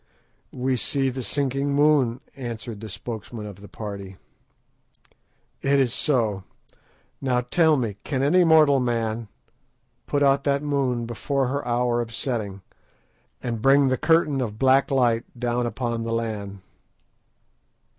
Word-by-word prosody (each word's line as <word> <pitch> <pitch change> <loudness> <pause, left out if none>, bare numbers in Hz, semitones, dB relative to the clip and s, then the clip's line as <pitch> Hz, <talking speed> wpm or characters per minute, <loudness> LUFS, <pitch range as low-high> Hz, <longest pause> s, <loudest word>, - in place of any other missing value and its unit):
"We 130 0 -1
see 135 +2 +1
the 130 +1 -5
sinking 140 +1 -1
moon," 145 -4 +3
answered 115 -4 -6
the 110 - -7
spokesman 110 +1 -7
of 100 -3 -9
the 100 +1 -12
party. 100 -3 -7 1.4
"It 140 0 +3
is 130 -4 +2
so. 110 -9 +1 0.8
Now 125 -3 +1
tell 155 +5 +3
me, 110 -6 -2
can 135 -2 -1
any 180 +6 +4
mortal 155 -4 +5
man 115 -2 -1 0.8
put 145 0 +1
out 140 0 +3
that 140 0 +1
moon 135 -5 0
before 130 +3 -1
her 140 +2 -2
hour 120 0 +1
of 115 -1 -6
setting, 105 -8 -3 0.8
and 115 -3 -3
bring 135 +2 +5
the 130 - +2
curtain 155 -3 +2
of 110 -4 -4
black 135 +2 +4
night 120 -4 +2 0.2
down 120 0 0
upon 120 -1 -3
the 115 0 -2
land?" 105 -4 -4
125 Hz, 135 wpm, -24 LUFS, 115-140 Hz, 1.4 s, mortal